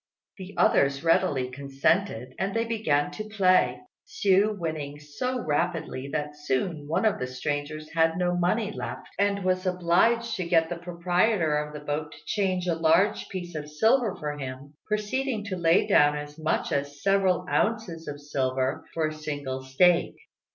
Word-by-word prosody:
The 190 Hz, +1 st, -9 dB
others 140 Hz, +1 st, +3 dB
readily 165 Hz, -7 st, +2 dB
consented, 140 Hz, -, 0 dB
and 195 Hz, +2 st, -1 dB
they 230 Hz, 0 st, +1 dB
began 160 Hz, -11 st, 0 dB
to 215 Hz, -, -5 dB
play, 190 Hz, -4 st, +3 dB, 0.3 s
Hsiu 200 Hz, +2 st, +2 dB
winning 155 Hz, -4 st, -4 dB
so 150 Hz, -, -3 dB
rapidly 155 Hz, -3 st, -1 dB
that 150 Hz, -1 st, -3 dB
soon 145 Hz, +2 st, -2 dB
one 165 Hz, +8 st, 0 dB
of 215 Hz, -, +2 dB
the 125 Hz, -, -2 dB
strangers 145 Hz, +4 st, -4 dB
had 165 Hz, 0 st, +2 dB
no 180 Hz, -1 st, +1 dB
money 200 Hz, +5 st, +1 dB
left, -, -, -6 dB
and 200 Hz, -1 st, +1 dB
was 185 Hz, 0 st, +1 dB
obliged 185 Hz, +7 st, +2 dB
to 185 Hz, -, -2 dB
get 165 Hz, -2 st, +3 dB
the 175 Hz, -, -3 dB
proprietor 175 Hz, 0 st, +1 dB
of 150 Hz, 0 st, -2 dB
the 150 Hz, -, -6 dB
boat 150 Hz, +1 st, -3 dB
to -, -, -13 dB
change 185 Hz, -3 st, 0 dB
a 175 Hz, -, +1 dB
large 165 Hz, +6 st, +2 dB
piece 175 Hz, -2 st, -6 dB
of 150 Hz, -1 st, -5 dB
silver 220 Hz, -, +2 dB
for 150 Hz, -1 st, -5 dB
him, 135 Hz, +1 st, -7 dB
proceeding 215 Hz, +2 st, -1 dB
to 200 Hz, -2 st, -4 dB
lay 170 Hz, -1 st, +3 dB
down 145 Hz, 0 st, +4 dB
as 150 Hz, +1 st, -8 dB
much 155 Hz, -, -1 dB
as 145 Hz, 0 st, -3 dB
several 190 Hz, -2 st, +2 dB
ounces 200 Hz, -8 st, -1 dB
of 145 Hz, -1 st, -5 dB
silver 130 Hz, -2 st, -1 dB
for 160 Hz, -1 st, +1 dB
a -, -, -7 dB
single 145 Hz, -4 st, -4 dB
stake. 170 Hz, +7 st, +3 dB
165 Hz, 165 wpm, -27 LUFS, 145-190 Hz, 0.3 s, down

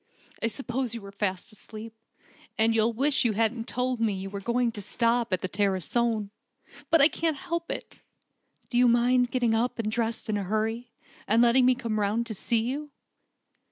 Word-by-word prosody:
"I -, -, +2 dB
suppose 250 Hz, 0 st, -3 dB
you 230 Hz, -, -6 dB
were 200 Hz, -, -9 dB
fast 195 Hz, -1 st, -3 dB
asleep, 220 Hz, +1 st, -8 dB, 0.6 s
and 225 Hz, +1 st, +3 dB
you'll 225 Hz, +1 st, +3 dB
wish 270 Hz, +5 st, +2 dB
you 235 Hz, -3 st, +2 dB
hadn't 225 Hz, +2 st, 0 dB
told 250 Hz, -1 st, -1 dB
me 225 Hz, -2 st, +1 dB
you 195 Hz, 0 st, -5 dB
were 200 Hz, -, -4 dB
going 235 Hz, +3 st, 0 dB
to 210 Hz, -, -7 dB
stop 235 Hz, +2 st, +1 dB
at 185 Hz, -, +1 dB
the -, -, -2 dB
Tarascon. 205 Hz, +3 st, 0 dB, 0.6 s
But 330 Hz, -3 st, +5 dB
I 285 Hz, -, +8 dB
can't 320 Hz, -2 st, -1 dB
help 340 Hz, -1 st, -4 dB
it! -, -, -6 dB, 0.7 s
Do 240 Hz, -, +1 dB
you 250 Hz, -, +6 dB
mind 245 Hz, +1 st, +3 dB
getting 245 Hz, -3 st, +1 dB
up 235 Hz, +3 st, 0 dB
and 215 Hz, -2 st, -2 dB
dressing 225 Hz, -2 st, -1 dB
in -, -, -2 dB
a -, -, -3 dB
hurry, 220 Hz, +4 st, -2 dB, 0.4 s
and 225 Hz, +3 st, +4 dB
letting 250 Hz, +2 st, +5 dB
me 255 Hz, -, +5 dB
come 230 Hz, -4 st, -2 dB
round 210 Hz, +3 st, 0 dB
to 230 Hz, -, -4 dB
see 225 Hz, +3 st, 0 dB
you?" 280 Hz, +6 st, -3 dB
230 Hz, 190 wpm, -27 LUFS, 215-250 Hz, 0.7 s, I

